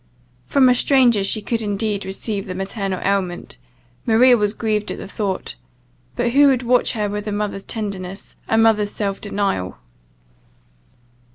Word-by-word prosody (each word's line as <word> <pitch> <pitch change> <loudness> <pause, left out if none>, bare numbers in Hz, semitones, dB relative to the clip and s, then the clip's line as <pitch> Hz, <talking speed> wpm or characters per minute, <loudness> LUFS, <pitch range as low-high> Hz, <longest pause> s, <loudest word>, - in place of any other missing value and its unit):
From 270 - +4
a 250 - +6
stranger 245 -5 +3
she 210 +2 +1
could 230 +1 -1
indeed 205 -1 -2
receive 195 +1 -4
the 185 - -5
maternal 195 0 -3
aliment, 185 - -2 0.4
Maria 245 +2 +5
was 210 -1 0
grieved 215 -2 -1
at - - -4
the - - -8
thought 200 -1 -3 0.6
but 240 0 0
who 285 +3 +6
would 260 -2 +2
watch 245 +1 +2
her 210 -3 -1
with 210 +1 -5
a - - -2
mother's 205 -1 -3
tenderness, 195 -3 -5
a 225 - +1
mother's 220 -2 +3
self 200 -2 -3
denial? 195 - -2
210 Hz, 155 wpm, -20 LUFS, 195-230 Hz, 0.6 s, a